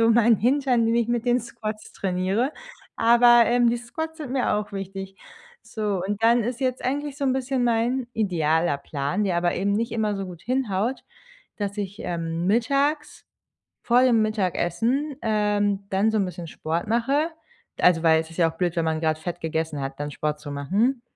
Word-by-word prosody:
so 230 0 +5
mein 230 0 +5
Hintern, 250 +1 +2
den 230 - +2
ich 235 -1 +1
mit 240 -1 0
den 245 0 +3
Squats 215 -2 -7
trainiere, 195 +8 -1 0.4
aber, 240 +1 +6
ähm, 240 0 +3
die 240 - 0
Squats 320 +7 -6
sind 280 -5 -6
mir 260 -5 +1
auch 210 0 -3
wichtig. 195 0 -6 0.5
So 205 -5 -2
und 205 +2 -3
dann 235 +1 +5
ist 245 +2 -3
jetzt 255 -2 -1
eigentlich 285 +2 -2
so 285 - -3
'n 265 - +2
bisschen 260 -1 -1
mein 235 +2 +1
idealer 165 -6 +1
Plan, 140 +7 -2
der 185 -3 0
aber 175 0 +1
eben 200 +2 0
nicht 230 +4 -1
immer 215 -2 0
so 195 -1 -4
gut 175 -2 -10
hinhaut, 245 -1 -1 0.6
dass 205 0 -4
ich, 200 +1 -5
ähm, 165 -2 -3
mittags, 275 +8 0 0.6
vor 245 +1 +4
dem 245 -3 +4
Mittagessen, 215 - -1
ähm, 205 -2 +1
dann 195 +3 +2
so 220 - +1
'n 195 - +2
bisschen 175 -2 -7
Sport 160 +2 -3
mache. 270 +8 +1 0.5
Also, 170 -2 +4
weil 160 -1 +5
es 160 0 -8
ist 165 - -12
ja 165 -2 +3
auch 165 - -22
blöd, 175 -2 0
wenn 165 - +1
man 160 -1 -1
gerade 155 -1 0
Fett 175 +1 -5
gegessen 160 -2 -2
hat, 135 0 -5
dann 145 0 -4
Sport 150 +1 -3
zu 150 -1 -9
machen. 210 - 0
210 Hz, 195 wpm, -24 LUFS, 175-240 Hz, 0.6 s, aber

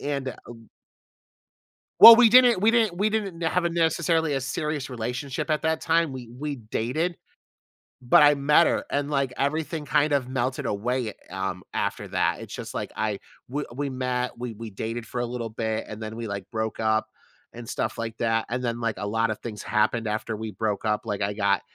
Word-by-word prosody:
and, 140 -2 -3
um 115 -2 -12 1.3
Well, 230 +1 +13
we 235 -2 +6
didn't 245 -5 +6
we 225 - +6
didn't 220 -7 +2
we 210 +3 +1
didn't 195 -6 -3
have 170 +2 +1
a - - +2
necessarily 165 -1 +1
a 135 - 0
serious 150 +1 -3
relationship 125 +4 -4
at 155 - +1
that 160 0 0
time, 165 -3 +2
we 125 -3 -8
we 145 +3 -5
dated, 125 +10 -2 0.8
but 125 +3 +5
I 145 0 +7
met 145 - +4
her 285 0 0
and, 145 0 -1
like, 140 -3 0
everything 155 +2 -2
kind 150 +1 +2
of 140 -3 +1
melted 130 +2 -2
away, 115 +1 -2 0.2
um, 95 -1 -4
after - - -2
that, - - 0
it's - - -9
just - - -7
like - - -4
I 105 -2 -1 0.3
we 145 +4 -3
we 140 +2 -3
met, 125 -1 -2
we 125 -1 -5
we 115 0 -7
dated 115 +3 -5
for 120 - -3
a - - -1
little 120 -1 -4
bit, 110 0 -3
and 110 +1 -7
then 110 +1 -6
we, 115 - -4
like, 100 -2 -5
broke 110 0 -3
up 110 0 +1 0.5
and 120 -1 -9
stuff - - -2
like 115 -1 -5
that. 115 -1 0
And 125 +2 -2
then, 120 -1 -3
like, 115 -3 -1
a 100 +2 -4
lotta 115 0 0
things 105 -2 -8
happened 110 +1 +1
after 110 +1 -3
we 110 0 -5
broke 105 +1 -2
up, 110 +1 -1
like, 105 -2 -3
I 100 +1 0
got 100 -2 +1
125 Hz, 200 wpm, -25 LUFS, 110-150 Hz, 1.3 s, Well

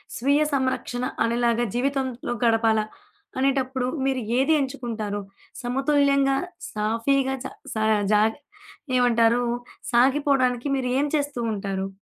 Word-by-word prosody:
స్వీయ 280 +5 +2
సంరక్షణ 260 -2 -1 0.2
అనేలాగా 235 0 +1
జీవితంలో 260 -1 -1
గడపాలా? 225 -1 +3 0.5
అనేటప్పుడు 260 -1 0 0.2
మీరు 265 -3 0 0.2
ఏది 275 +4 +3
ఎంచుకుంటారు? 230 -6 -4 0.4
సమతుల్యంగా, 275 +1 +2 0.3
సాఫీగా 230 +6 0
చ - - -11 0.3
స - - -2 0.4
జాగ 215 +1 +4 0.7
ఏమంటారు? 240 -1 +3 0.5
సాగిపోవడానికి 260 0 +3
మీరు 250 -1 -2
ఏం 285 - +2
చేస్తూ 285 -3 -2
ఉంటారు? 195 -1 -3
250 Hz, 100 wpm, -24 LUFS, 230-275 Hz, 0.7 s, జాగ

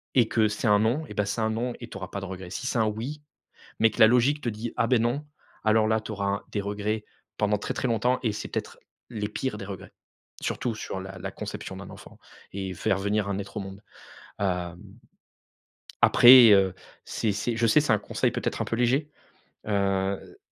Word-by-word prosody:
et 120 -3 +5
que 110 -2 +2
c'est 110 +2 -2
un 105 0 +5
«non» 120 +9 +1
et - - -8
bah 105 - 0
c'est 105 +3 -2
un 110 - +1
«non» 120 +2 -2
et 120 - -8
tu - - -11
auras 95 - -6
pas 100 - -5
de - - -5
regrets. 95 -1 -7
Si 120 - -5
c'est 125 - -1
un 110 - +3
«oui», 125 +8 -4 0.6
mais 115 0 +4
que - - -8
la 110 - +10
logique 125 +5 +3
te 120 - -3
dit: 110 +1 -4
«Ah 115 - +2
beh 125 0 +3
non». 125 +6 -1 0.4
Alors 110 0 +4
là 110 0 +2
tu 110 - -7
auras 100 0 -2
des 105 - -2
regrets 105 +2 -3 0.3
pendant 105 -1 +1
très - - -4
très 130 - -1
longtemps 120 +3 +1
et 110 -3 0
c'est - - -6
peut-être - - -5 0.3
les 105 -3 -3
pires 110 0 -3
des 100 - -6
regrets, 95 -2 -8 0.5
surtout 120 -3 -2
sur 95 -3 -5
la 95 0 -8
la - - -5
conception - - -6
d'un - - -9
enfant - - -13 0.3
et 95 -1 -4
faire 95 +3 0
venir 100 +1 0
un 100 0 -2
être 100 +2 -8
au - - -3
monde. 95 +1 -8 0.6
Hem, 90 -3 -2 1.2
après, 120 -2 +9
heu, 95 -2 +5 0.3
c'est 110 - -1
c'est 115 +3 -2
je 115 -1 +2
sais, 150 +6 +5
c'est 150 - 0
un 105 - +2
conseil - - -1
peut - - -3
être - - -1
un - - -1
peu 115 - -2
léger, 135 +5 +1 0.6
heu 100 -1 -1
110 Hz, 220 wpm, -26 LUFS, 100-120 Hz, 1.2 s, la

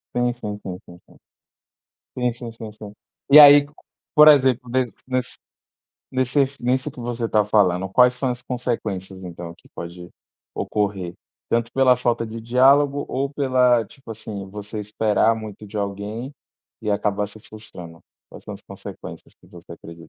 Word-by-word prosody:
Sim, 120 0 +1
sim, 105 -4 -6
sim, 90 -1 -6
sim, 90 0 -14
sim. - - -20 1.0
Sim, 125 -1 +1
sim, 120 0 -8
sim, 110 -1 -9
sim. 105 -1 -11 0.4
E 150 - +11
aí, 145 -1 +9 0.5
por 150 0 +8
exemplo, 130 -4 +5
nesse 125 -1 -1
nesse 130 -1 -2 0.7
nesses 130 +2 0
nisso 130 +4 -1
que 130 - -12
você 120 0 -4
está 105 -1 +2
falando, 95 -3 +2
quais 125 +6 +5
são 130 +1 -2
as 125 0 -5
consequências, 105 -7 -4
então, 85 -1 -8
que - - -23
pode 85 +1 -8 0.5
ocorrer? 100 -4 -2 0.4
Tanto 115 0 0
pela 130 -2 +4
falta 120 -2 -1
de 115 +1 -7
diálogo 135 +4 +3
ou 135 +1 -2
pela, 125 -4 +3
tipo 135 +1 -15
assim, 105 -3 -7
você 105 +2 -7
esperar 105 +1 +1
muito 110 -1 -9
de 105 +2 -9
alguém, 100 +5 -4 0.5
e 105 - -3
acabar 105 0 0
se 105 +1 -14
frustrando. 90 -7 -12 0.3
Quais - - -13
são - - -7
as - - -13
consequências - - -10
que - - -24
você 85 -1 -13
acredita? 85 0 -12
115 Hz, 160 wpm, -22 LUFS, 100-125 Hz, 1.0 s, E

